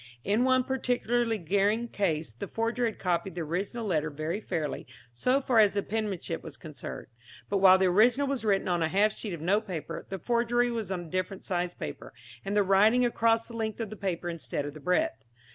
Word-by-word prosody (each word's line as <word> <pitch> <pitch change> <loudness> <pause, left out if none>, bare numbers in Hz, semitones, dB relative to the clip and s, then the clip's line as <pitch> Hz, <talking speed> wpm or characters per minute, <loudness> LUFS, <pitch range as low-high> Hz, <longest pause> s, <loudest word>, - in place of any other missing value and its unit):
In 210 +5 +2
one 255 0 +4
particularly 245 -3 0
glaring 205 +6 +1
case 165 - -1
the 115 - -6
forger 230 +2 -1
had 225 - -2
copied 175 0 -1
the 175 - -3
original 195 +8 -3
letter 155 -6 0
very 155 +6 -3
fairly 160 -7 -3 0.3
so 250 - +2
far 255 -4 +2
as 205 -2 +5
the 200 - 0
penmanship 205 -6 -3
was - - -10
concerned, 155 -3 -8 0.4
but 200 - +1
while 190 -1 +8
the 190 - +2
original 230 +9 +4
was 275 -3 -2
written 200 -3 +1
on 175 -2 +1
a 160 - +2
half 205 +5 +2
sheet 215 - -6
of 165 - -6
note 205 +6 +1
paper, 170 -5 -5
the 195 - -3
forgery 240 +3 +1
was 225 -5 -3
on 185 -2 -2
a 170 - -10
different 185 +1 -3
size 175 -1 -2
paper, - - -7 0.3
and 200 +1 -1
the 205 - +5
writing 210 +6 +4
across 230 -1 +2
the 235 - -9
length 220 -1 -3
of 220 -3 -4
the - - -6
paper 185 -4 -3
instead 165 -4 -3
of 145 - -6
the 155 - -10
breadth. 150 -8 0
200 Hz, 210 wpm, -29 LUFS, 175-230 Hz, 0.4 s, while